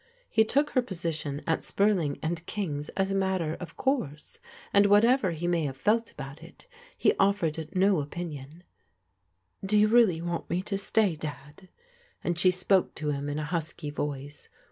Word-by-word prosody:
He 220 - +5
took 285 +7 +1
her 255 - +3
position 165 - -3
at 160 - 0
Spurling 195 -8 +1
and 165 +1 -2
King's 150 -8 -3
as 195 0 +1
a - - 0
mat 190 -1 +1
ter 160 -2 -2
of 170 -2 -9
course, 240 - -2 0.3
and 200 0 +6
whatever 215 +2 +4
he 170 0 -4
may 175 -2 +1
have 135 -2 -4
felt 220 +9 +1
about 135 0 -9
it, - - -14 0.3
he - - +3
offered 165 -6 +1
no 190 -1 +4
opinion. 150 0 -7 0.5
" 95 - -45
Do 205 +2 +2
you 210 +1 +5
really 220 -8 +5
want 170 0 -4
me 180 +2 -1
to 195 0 -2
stay, 200 -3 +2
Dad? 150 +3 -8 0.3
" 485 0 -34
and 175 -1 -1
she 185 - +5
spoke 185 +1 +2
to 150 -1 -2
him 140 0 -3
in 145 - -3
a 155 - -2
husky 160 -2 -4
voice. 145 0 -5
170 Hz, 185 wpm, -28 LUFS, 150-200 Hz, 0.5 s, and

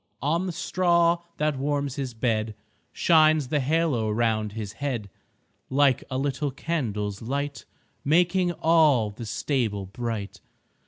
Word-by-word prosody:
On 165 +6 +1
the - - -2
straw 170 0 +2 0.2
that 150 -3 0
warms 140 -1 -1
His 130 -4 -4
bed 110 -2 -1 0.4
Shines 155 -4 +4
the 150 - +1
halo 140 -5 +1
'round 110 -1 0
His 105 -2 -5
head, 120 -7 -4 0.6
Like 135 -1 +3
a 130 - -2
little 140 +1 -1
candle's 110 -9 -3
light 140 +4 -3 0.4
Making 175 +4 +3
all 155 -10 +3
the 115 +2 -8
stable 110 -4 -1
bright. 110 0 -5
135 Hz, 125 wpm, -26 LUFS, 110-155 Hz, 0.6 s, Shines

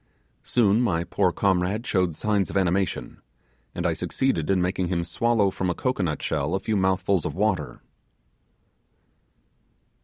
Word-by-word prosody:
Soon 110 -1 +2
my 85 -9 +1
poor - - +1
comrade 95 +4 0
showed 90 -5 0
signs 105 +1 0
of - - -2
animation, 95 0 -1 0.5
and - - -3
I - - +2
succeeded 110 - -1
in 95 -1 +3
making 90 0 0
him 85 -1 -1
swallow 105 +3 +1
from 95 -1 -2
a 90 - -1
cocoanut 95 - -1
shell 75 +3 -1
a - - 0
few 110 - -2
mouthfuls 95 -2 +1
of - - -4
water. 90 - -1
95 Hz, 145 wpm, -25 LUFS, 90-105 Hz, 0.5 s, in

